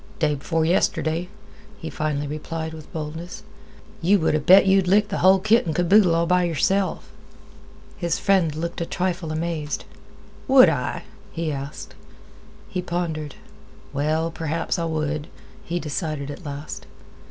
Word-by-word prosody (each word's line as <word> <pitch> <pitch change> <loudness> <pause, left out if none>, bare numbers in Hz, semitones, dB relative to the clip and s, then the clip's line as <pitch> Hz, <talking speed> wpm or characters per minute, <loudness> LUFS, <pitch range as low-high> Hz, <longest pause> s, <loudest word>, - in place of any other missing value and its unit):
"Day 155 -2 +1
b'fore 160 +3 -1
yesterday," 165 0 +1 0.5
he 160 - -7
finally 150 -1 -2
replied, 160 +2 -5
with 155 -1 -11
boldness, 160 +6 -6 0.6
"you 190 +5 +4
would 160 -4 +1
'a' 155 - +2
bet 190 +5 +7
you'd 190 -1 +4
lick 205 +3 +4
the 195 - -2
hull 190 +1 +6
kit 215 +1 +3
an' 160 - 0
boodle 175 +1 +4
all 170 0 +2
by 180 +1 +3
yourself." 185 +3 0 0.9
His 170 -2 -1
friend 180 -6 +2
looked 170 +2 -4
a - - 0
trifle 180 -3 -2
amazed. 155 -2 -3 0.6
"Would 260 -9 +8
I?" 125 -6 -2 0.3
he 165 -2 -2
asked. 140 +1 -6 0.7
He 185 -4 -3
pondered. 165 -5 -3 0.6
"Well, 155 +3 0
perhaps 165 +3 -2
I 170 - -1
would," 155 -2 -2 0.4
he 175 +1 -2
decided 150 -2 -3
at 175 - -9
last. 145 +1 -7
165 Hz, 145 wpm, -23 LUFS, 155-180 Hz, 0.9 s, Would